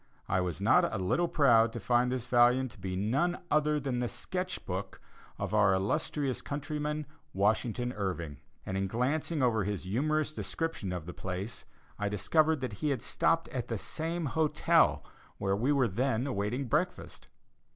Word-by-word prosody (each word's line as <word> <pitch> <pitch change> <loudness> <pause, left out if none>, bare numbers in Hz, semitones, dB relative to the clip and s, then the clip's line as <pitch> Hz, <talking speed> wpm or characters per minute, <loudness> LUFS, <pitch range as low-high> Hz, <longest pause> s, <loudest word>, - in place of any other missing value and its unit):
I 95 - +1
was 90 -4 -3
not - - +4
a - - -2
little 95 - +1
proud 115 -8 +4
to 120 - -4
find 120 +3 +2
this 125 -2 -2
volume 125 +1 +4
to 120 - -17
be 95 -1 -4
no 135 - +1
other 150 0 +3
than 130 -3 -2
the 125 - 0
"Sketch 185 +8 -4
Book" 95 +2 -4 0.4
of - - -4
our 100 -3 +5
illustrious 135 +6 -1
countryman, 150 +1 -3 0.3
Washington 110 +4 +1
Irving; 85 - -3 0.3
and 95 - -3
in 95 0 0
glancing 140 - 0
over 110 -4 +2
his 100 0 -3
humorous 155 +10 0
description 165 - -3
of 90 -3 -4
the 85 - -7
place, 95 +4 -5 0.3
I 105 -1 0
discovered 155 - +2
that 130 -5 -3
he 150 - +1
had 135 -5 -1
stopped 165 0 +1
at 130 -6 -4
the 115 - -2
same 165 - -3
hotel 155 +2 +2 0.3
where 95 0 0
we 120 +8 +1
were 135 -4 +3
then 125 +4 0
awaiting 125 +1 -1
breakfast. 120 - -2
125 Hz, 170 wpm, -31 LUFS, 100-150 Hz, 0.4 s, our